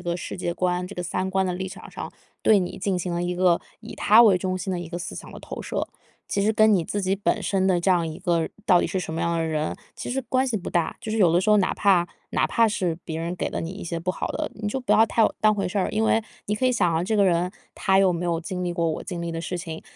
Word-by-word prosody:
世 175 - -6
界 175 -1 -2
观， 180 0 -1
这 200 - -10
个 180 - -3
三 185 +2 -2
观 190 0 +1
的 185 - -1
立 185 +1 -4
场 190 +1 -10
上， - - -6 0.3
对 215 - +5
你 180 -2 -2
进 190 -1 -1
行 180 0 -3
了 170 - -1
一 175 0 -2
个 180 -1 +3 0.2
以 225 - -9
他 220 +3 +6
为 200 -5 +6
中 185 0 -2
心 185 +1 -4
的 180 - -2
一 175 - -6
个 175 +1 -5
思 175 - -5
想 - - -8
的 - - -10
投 - - -7
射。 - - -2 0.5
其 200 - +1
实 215 +2 +2
跟 215 0 +5
你 180 -5 +2
自 205 - -2
己 190 0 +1
本 200 - 0
身 190 -1 +1
的 185 -2 +3
这 190 - +1
样 175 -3 +3
一 155 - -7
个 170 -3 +1 0.2
到 180 -5 +5
底 - - +1
是 190 - -2
什 165 - -5
么 160 - -3
样 170 0 0
的 165 - 0
人， 155 -1 -1 0.2
其 - - -5
实 270 +2 -1
关 260 +1 +2
系 245 - -1
不 190 - -4
大。 170 -2 0
就 220 - -5
是 220 - -1
有 180 -6 +4
的 175 - +4
时 215 - 0
候 210 - +6
哪 195 - +2
怕 185 -4 +3 0.2
哪 - - +1
怕 230 -1 +3
是 185 -5 0
别 160 -1 -4
人 170 +2 -3
给 - - -2
了 - - -3
你 165 - -4
一 195 - -8
些 170 0 -3
不 180 +2 -1
好 - - -3
的， - - -3
你 210 -1 -5
就 265 - -2
不 250 - -2
要 220 - +7
太 220 0 +3
当 215 0 +4
回 200 - -1
事 195 +3 -1
儿。 185 - 0
因 215 +1 0
为 225 0 +3 0.2
你 205 - -1
可 235 +5 +1
以 - - +3
想 185 -8 +2
象 165 +1 +1
这 215 +3 0
个 200 - +5
人 180 0 +1 0.2
他 190 0 +2
有 190 -2 +4
没 175 +1 -2
有 170 -1 0
经 180 +2 -4
历 175 - -1
过 170 -1 0
我 160 - -2
经 175 - -5
历 170 - -3
的 165 0 -4
事 180 +2 -3
情， 165 -2 -6
185 Hz, 335 characters per minute, -24 LUFS, 170-205 Hz, 0.5 s, 要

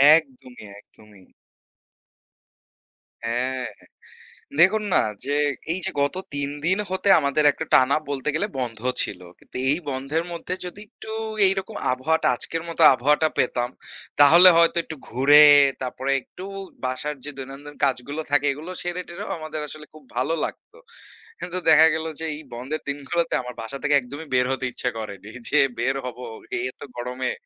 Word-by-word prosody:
একদমই, 130 -6 -5
একদমই। 105 -2 -19 2.0
হ্যাঁ। 125 +2 -1 1.0
দেখুন 210 +5 +5
না - - +5 0.3
যে, 140 - -3 0.4
এইযে 190 +1 -2
গত 145 +5 0 0.2
৩ 140 0 0 0.2
দিন 185 +2 +3
হতে 190 +2 0
আমাদের 140 +1 +1
একটা 160 - -6
টানা 130 +2 +5
বলতে 140 0 -2
গেলে 200 +7 0
বন্ধ 115 -4 -4 0.2
ছিল। 90 - -5 0.2
কিন্তু - - -9
এই 150 - +2
বন্ধের 140 +5 -2
মধ্যে 170 +1 -5
যদি 190 +3 -8
একটু 220 - -13 0.4
এইরকম 195 +2 -2 0.2
আবহাওয়াটা, 155 +6 0
আজকের 165 +6 -1
মতো 165 - -3
আবহাওয়াটা 150 +5 +2
পেতাম, 120 -1 0 0.5
তাহলে 170 +6 +9
হয়তো 170 0 +4
একটু 160 - -8
ঘুরে, 145 +5 +7 0.4
তারপরে 130 +1 -3
একটু 180 - -13 0.4
বাসার 140 +4 -3
যে 145 - -4
দৈনন্দিন 140 +2 -9
কাজগুলো 140 +3 -1
থাকে, 145 0 +3
এগুলো 155 +6 -9
সেরে 175 +1 -3
টেরেও 170 - -7
আমাদের 155 -1 -6
আসলে 150 +1 -9
খুব 155 - -15
ভালো 130 +6 0
লাগতো। 475 - -10 0.6
কিন্তু 180 0 -4
দেখা 160 0 +8
গেল 160 0 -3
যে, 160 - -3
এই 150 - -9
বন্ধের 135 +6 -5
দিনগুলোতে 155 +4 -2
আমার 125 0 -8
বাসা 115 +5 -3
থেকে 145 0 +3
একদমই 140 +5 -6
বের 125 0 +3
হতে 130 0 -1
ইচ্ছা 125 - -1
করেনি, 100 -2 -8 0.2
যে 150 - +2 0.2
বের 130 +3 0
হব 125 - -6 0.4
এই 120 - -2
এতো - - -11
গরমে। 125 +1 -3
145 Hz, 155 wpm, -23 LUFS, 130-160 Hz, 2.0 s, তাহলে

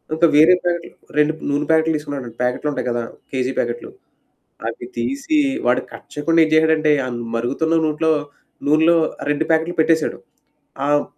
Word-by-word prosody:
ఇంకా 170 +1 +4
వేరే 155 +4 +7
ప్యాకెట్లు 170 -1 -2 0.3
2 150 +1 +3 0.2
నూనె 145 +1 0
ప్యాకెట్లు 160 0 +3
తీసుకున్నాడండి 140 -6 -7
ప్యాకెట్లుంటాయి 125 +3 -1
గదా! 120 0 -1 0.3
కేజీ 130 -1 -1
ప్యాకెట్లు. 120 0 -2 0.8
అవి - - -6
తీసి 280 +3 -1 0.3
వాడు 125 +1 +3
కట్ - - -12
చేయకుండా 165 +3 +1
ఏం 155 - +1
చేశాడంటే 155 -1 +4
ఆ - - -3 0.3
మరుగుతున్న 140 +8 0
నూట్లో 160 +1 +1 0.6
నూనెలో 160 +3 +4 0.3
ఆ - - -4
2 150 +2 0
ప్యాకెట్లు 165 +2 +1
పెట్టేశాడు. 160 0 +2 0.7
అవును. 145 0 +2
155 Hz, 145 wpm, -20 LUFS, 145-160 Hz, 0.8 s, వేరే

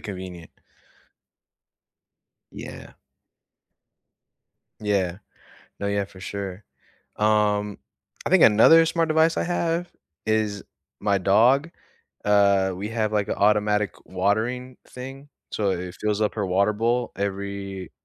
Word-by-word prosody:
convenient. 90 -4 -8 2.0
Yeah. - - -9 1.9
Yeah. 100 -4 0 0.6
No, 100 - -2
yeah, 100 0 0
for 95 -1 -15
sure. 100 0 -6 0.5
Um, 105 -1 +1 0.5
I - - 0
think - - +5
another 160 +10 +7
smart 165 0 0
device 160 +1 +3
I - - 0
have 170 0 -1 0.4
is 110 -2 0 0.4
my 100 -1 +2
dog. 120 - +3 0.5
Uh, 100 -2 +3
we 100 +4 -5
have, 110 -2 -1
like, 105 -1 0
a - - -2
automatic 105 0 +2
watering 110 +7 -1
thing. 135 +3 -9 0.2
So 100 -2 0
it 90 0 -5
fills 105 0 0
up 105 - 0
her 105 -2 -1
water 100 +3 +2
bowl 120 +3 0
every 100 -1 -4
105 Hz, 115 wpm, -24 LUFS, 100-115 Hz, 2.0 s, another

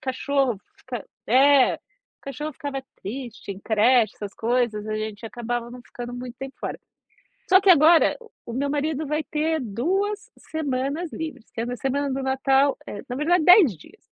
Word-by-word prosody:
cachorro 265 -2 0 0.2
fica 245 -5 -7 0.2
é, 270 +2 +5
o - - -9 0.5
cachorro 295 +3 -5
ficava 275 -1 -5 0.2
triste 235 0 -7
em 195 - -12
creche, 220 +1 +3
essas 205 -2 -7
coisas, 230 -2 0
a 215 - -2
gente 215 +1 -5
acabava 240 0 -4
não 250 0 -10
ficando 245 0 -8
muito 245 0 -7
tempo 270 0 -7
fora. - - -5 0.7
Só 375 0 +7
que 390 - +6
agora, 325 +1 +6 0.3
o 235 - -6
meu 280 +4 -1
marido 300 +1 -1
vai 305 +2 -1
ter 315 +1 -1
2 390 - -2 0.2
semanas 290 +2 -2
livres, 310 -7 -6
tendo 235 +2 -3
a 245 - -4
semana 280 +2 -1
do 270 - -2
Natal, 270 +1 +2
eh, 205 - -6
na 245 - -4
verdade 320 +4 +2
10 360 - +7
dias. 415 - -18
265 Hz, 170 wpm, -24 LUFS, 240-300 Hz, 0.7 s, Só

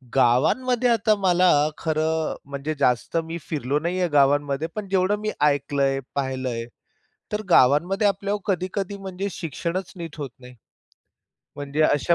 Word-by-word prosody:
गावांमध्ये 240 - +3
आता 220 -2 +3
मला 180 -1 +4 0.3
खरं 160 0 -1
म्हणजे 140 +2 -3
जास्त 125 +3 +1
मी 165 +1 -5
फिरलो 145 -2 -1
नाही 175 +4 -2
आहे 180 -2 +1
गावांमध्ये. 145 +1 +2
पण 210 -2 -4
जेवढं 190 +1 +2
मी 215 0 -2
ऐकलंय, 140 -2 +2 0.2
पाहिलंय 130 -4 -2 0.7
तर 210 - -1
गावांमध्ये 175 - +4
आपल्यावर 200 +1 -1
कधी-कधी 195 +1 -2
म्हणजे 195 0 -5
शिक्षणच 170 +3 -4
नीट 165 -3 -7
होत 145 -3 -4
नाही. 125 0 -13 1.0
म्हणजे 145 +2 -1
अशा 155 +2 +3
160 Hz, 135 wpm, -24 LUFS, 140-195 Hz, 1.0 s, मला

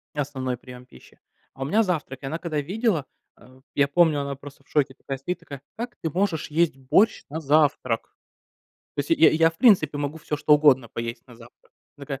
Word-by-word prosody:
основной 130 -3 -3
прием 125 0 -12
пищи. - - -19 0.3
А 135 - -14
у - - -3
меня 215 +10 +3
завтрак. 150 - -3
И - - -5
она 155 +4 -3
когда 155 -4 -2
видела, 190 - -1 0.3
э, 130 +1 -19
я 140 0 +3
помню, 155 -1 +3
она 140 0 -4
просто 140 0 -13
в - - -33
шоке 140 -3 +1
такая 135 0 -6
сидит, 180 +7 -4
такая: 140 -2 -10 0.2
"Как 240 +2 -5
ты 160 - -1
можешь 175 -2 -1
есть 165 -3 +1
борщ 165 - +2
на 160 - -4
завтрак?" 140 -5 +1 0.8
То - - +1
есть, 145 - -6
я 165 0 +6
я, 165 +1 +4
в 165 - -22
принципе, 155 - +4
могу 145 +2 -3
всё, 150 -1 -3
что 150 +1 +4
угодно 135 -5 +4
поесть 115 +1 -5
на 120 - -15
завтрак. 120 +1 -18 0.3
Такая. 140 -1 -6
145 Hz, 205 wpm, -24 LUFS, 135-165 Hz, 0.8 s, я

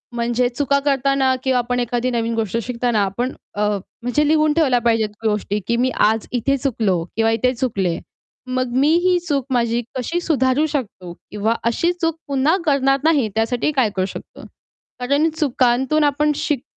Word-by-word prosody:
म्हणजे 240 +1 +1
चुका 280 +2 +1
करताना 270 -1 +2
किंवा 260 -1 +2
आपण 245 +1 -1
एखादी 245 +1 -1
नवीन 230 -1 -1
गोष्ट 225 0 -1
शिकताना 240 -2 0
आपण 240 +7 -2 0.2
अ, 205 - -2 0.4
म्हणजे 245 +5 +1
लिहून 305 0 +3
ठेवल्या 275 -7 +3
पाहिजेत 225 -2 +1 0.2
गोष्टी, 210 -1 0
की 235 - +1
मी 255 +2 +2 0.2
आज 225 0 -4
इथे 275 +3 0
चुकलो 215 -10 0
किंवा 225 0 +2
इथे 250 +3 +1
चुकले. 195 -9 -1 0.5
मग 255 -1 -2
मी 275 +3 +4 0.2
ही 365 -1 +3
चूक 280 -4 0
माझी 235 0 +1 0.2
कशी 295 +8 -2
सुधारू 280 -2 +1
शकतो 210 - -5 0.2
किंवा 210 +2 0
अशी 285 +9 +1
चूक 330 -1 +1
पुन्हा 280 +4 +2
करणार 275 -2 +2
नाही 305 -7 +3
त्यासाठी 240 +6 0
काय 260 -6 +2
करू 185 - +1
शकतो? 190 - -9 0.6
कारण 285 +5 +2
चुकांतून 265 +1 +2
आपण 295 +1 +2
शिक 300 -4 -2
250 Hz, 165 wpm, -20 LUFS, 230-280 Hz, 0.6 s, मी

